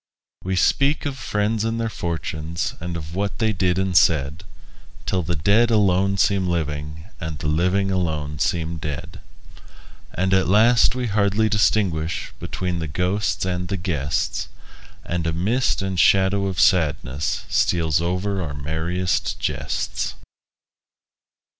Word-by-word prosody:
We 95 0 -1
speak 140 +11 +2
of 140 -2 -2
friends 110 -3 -1
and 115 +1 -1
their 115 - 0
fortunes, 85 -4 -3
And 85 0 -4
of 80 0 -8
what 100 +2 -2
they 110 -2 +1
did 90 -2 +1
and 95 -1 -1
said, 75 0 +3 0.6
Till 95 - 0
the 85 +1 -2
dead 100 +10 +3
alone 100 -3 +2
seem 95 -1 +2
living, 75 -2 -3 0.2
And 80 -1 -5
the 75 - -4
living 90 +5 +1
alone 75 -5 -2
seem 85 0 -1
dead. 75 -2 -6 1.0
And 95 +2 +1
at 95 0 +3
last 115 +5 +5
we 125 -1 -2
hardly 105 0 +2
distinguish 95 -6 0
Between 90 -2 -3
the 80 - -3
ghosts 90 +6 -1
and 90 -1 -2
the 95 - -2
guests; 80 -6 -2 0.6
And 85 -1 -2
a 80 - 0
mist 100 +5 0
and 95 -2 -2
shadow 95 +1 +4
of 95 -3 -3
sadness 75 -6 +1
Steals 80 -2 +1
over 95 +3 -1
our 75 -5 -4
merriest 80 +5 -2
jests. - - -2
90 Hz, 140 wpm, -22 LUFS, 80-100 Hz, 1.0 s, last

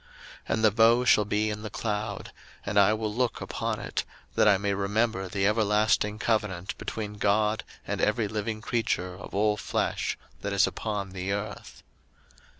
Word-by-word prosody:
01:009:016 - - -26 0.5
And 110 - -2
the 110 - +6
bow 115 +3 +5
shall 105 -4 +5
be 105 +1 0
in 105 0 -5
the 110 - -5
cloud; 105 0 -3 0.3
and 100 0 +2
I 100 +1 +6
will 110 -1 -1
look 120 0 0
upon - - -3
it, - - -3 0.3
that - - +4
I 100 -2 +6
may 100 +1 -1
remember 100 0 0
the 95 +1 -1
everlasting 105 0 +2
covenant 105 -5 -1
between 105 -2 -5
God 105 +2 +2 0.2
and - - -2
every 105 +1 +2
living 110 +1 -3
creature 110 -6 -1
of 90 +1 -9
all 105 +1 +2
flesh - - -1 0.2
that 100 0 -2
is 100 -1 +5
upon 105 -3 -3
the 95 +1 -3
earth. 105 +1 -5
105 Hz, 170 wpm, -28 LUFS, 100-110 Hz, 0.5 s, the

